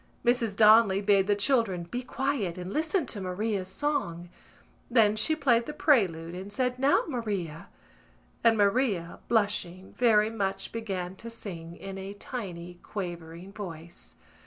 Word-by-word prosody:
Mrs 235 -4 +2
Donnelly 215 -2 +6
bade 200 -1 +3
the 205 - +3
children 205 -5 +1
be 245 +9 -4
quiet 250 -8 -2
and 180 +2 -6
listen 320 +2 +1
to 210 -4 -5
Maria's 190 +1 -2
song. 190 - -2 0.6
Then 220 -4 +4
she 315 +9 +2
played 240 -6 +2
the 300 - -4
prelude 180 - +2
and 190 +3 -7
said 250 +2 -1
"Now, 275 +2 +4
Maria!" 200 - -4 0.8
and 230 -1 +5
Maria, 200 -4 +1
blushing 200 -4 0
very 220 -3 +4
much 195 -3 -2
began 190 -5 -4
to 230 - -8
sing 170 -7 -7
in 195 0 -7
a 195 +1 -7
tiny 180 -7 -7
quavering 175 -1 -7
voice. 170 -5 -9
205 Hz, 140 wpm, -28 LUFS, 180-235 Hz, 0.8 s, Donnelly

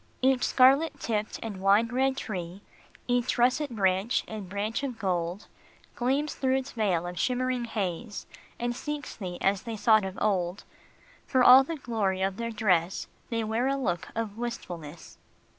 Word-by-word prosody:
Each 260 -1 +3
scarlet 275 +4 +4
tipped 215 -3 -2
and 205 -4 -6
wine 200 +4 +4
red 265 +2 +1
tree, 185 -4 -5 0.4
Each 245 0 +1
russet 255 +5 +2
branch 195 0 +1
and 210 -4 -7
branch 205 +5 -2
of 265 -4 -4
gold, 180 -2 -2 0.5
Gleams 275 +5 0
through 260 -1 +1
its 265 +1 -4
veil 190 -7 0
of 175 0 -5
shimmering 255 -1 0
haze, 205 -1 -4 0.3
And 240 0 -2
seeks 295 +2 -5
thee 180 -4 -6
as 195 0 +2
they 230 -2 -5
sought 215 0 +4
of 190 0 -5
old; 190 -3 0 0.6
For 260 -2 +3
all 255 +2 +9
the 330 +5 -4
"glory 210 -8 -1
of 195 0 -1
their 230 0 -3
dress, 190 -6 +1 0.2
They 230 -1 -1
wear 225 +4 0
a 275 - +1
look 180 -10 -2
of 225 -1 -4
wistfulness. 175 -9 -7
220 Hz, 160 wpm, -28 LUFS, 190-255 Hz, 0.6 s, all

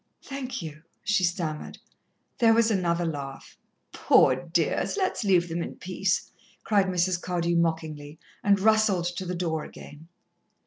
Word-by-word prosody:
"Thank 260 -6 -5
you," 155 -1 -8 0.2
she 210 -1 +1
stammered. 170 -3 -2 0.6
There 225 -1 +5
was 230 0 +3
another 175 -3 +1
laugh. 140 -4 -6 0.4
"Poor 130 - +4
dears! 165 - -1
Let's 375 - 0
leave 180 -4 +3
them 170 +1 -3
in - - -5
peace," 185 0 -2 0.3
cried 200 -3 +2
Mrs. 180 -1 0
Cardew 175 -1 -1
mockingly, 160 -3 -1 0.3
and 200 -1 +4
rustled 215 -4 +3
to 185 - -5
the 180 - -2
door 165 -3 -2
again. 150 +3 -12
175 Hz, 140 wpm, -26 LUFS, 165-200 Hz, 0.6 s, There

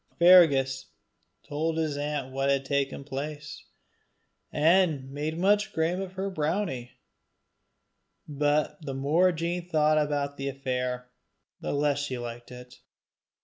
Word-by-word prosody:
Fergus 140 -7 +5 0.6
told 160 +2 -2
his 155 -3 -1
aunt 145 -2 -3
what 135 +1 0
had 135 -1 +1
taken 140 0 -1
place, 145 +2 -6 0.9
and 155 -4 +2
made 150 +3 -3
much 205 +3 +2
game 165 +4 0
of 190 -1 -6
her 195 +1 -3
brownie. 155 -6 -2 1.3
But 150 +1 0
the 135 -3 -5
more 155 +7 +3
Jean 170 +1 -3
thought 155 -1 +3
about 145 -1 -1
the 140 0 -3
affair, 125 -2 -3 0.5
the - - -3
less 145 0 +1
she 145 -3 -3
liked 120 0 -7
it. 125 0 -12
145 Hz, 125 wpm, -27 LUFS, 135-165 Hz, 1.3 s, Fergus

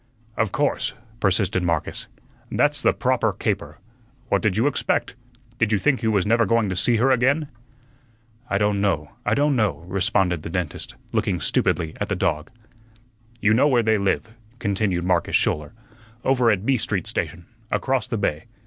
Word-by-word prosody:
"Of 110 -4 0
course," 145 +6 0 0.2
persisted 95 -2 +1
Marcus, 85 -3 -2 0.4
"that's - - +2
the - - +4
proper - - +1
caper. - - -3 0.5
What - - +2
did 110 -4 +1
you 115 - +2
expect? 145 - 0 0.5
Did 115 -2 +2
you 105 - +4
think 135 +4 +1
you 110 - +1
was 100 -4 +2
never 115 +1 +3
going 115 -1 +2
to 95 - -2
see 120 +6 +2
her 125 +4 +3
again?" 140 +4 +2 1.0
"I 95 - +1
don' 105 0 +1
know, 95 -5 0 0.2
I - - +3
don' 145 0 +2
know," 100 - 0
responded 95 -2 0
the 85 - -6
dentist, 85 -3 -4 0.2
looking - - 0
stupidly 80 -1 0
at - - -1
the - - 0
dog. 75 0 -1 0.9
"You 110 0 +4
know 130 +6 +4
where 125 -5 +3
they 110 -1 +2
live," 100 +3 -1 0.2
continued 100 -5 -1
Marcus 90 -1 +1
Schouler. 75 -1 +1 0.5
"Over 125 -3 +3
at 105 -2 +1
B 135 0 +3
Street 100 -5 -2
station, 85 0 -3 0.2
across 130 -1 0
the 120 -3 -2
bay. 80 -7 -1
105 Hz, 170 wpm, -23 LUFS, 90-120 Hz, 1.0 s, the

